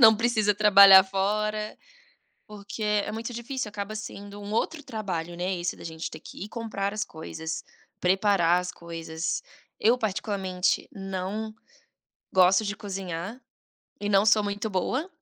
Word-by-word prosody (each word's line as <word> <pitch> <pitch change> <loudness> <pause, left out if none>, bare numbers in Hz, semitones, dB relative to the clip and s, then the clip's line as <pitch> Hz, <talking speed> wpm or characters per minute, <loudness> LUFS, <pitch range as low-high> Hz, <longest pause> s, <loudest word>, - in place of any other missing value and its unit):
não 220 -1 +9
precisa 215 -2 +2
trabalhar 200 -2 +9
fora. 210 +2 -1 0.7
Porque 210 +1 -7
é 210 0 +1
muito 230 +2 -4
difícil, 240 0 -4
acaba 205 +1 -5
sendo 205 -1 -8
um 205 0 -7
outro 295 +7 -1
trabalho, 180 -9 -4
né, 185 +2 -1
esse 175 - -2
da - - -11
gente 160 0 -5
ter 155 - -8
que 165 - -9
ir 210 - -8
comprar 215 -4 -3
as 215 - -1
coisas, 160 0 -6 0.4
preparar 185 -2 +3
as 180 0 -4
coisas. 165 -1 -4 0.4
Eu 235 +3 +4
particularmente 195 -4 -1
não 195 +1 -4 0.8
gosto 185 +3 +5
de 205 0 -2
cozinhar 195 +1 -5 0.6
e 205 - -1
não 200 0 +4
sou 215 0 +5
muito 205 +2 -2
boa, 255 - -1
200 Hz, 145 wpm, -27 LUFS, 185-215 Hz, 0.8 s, não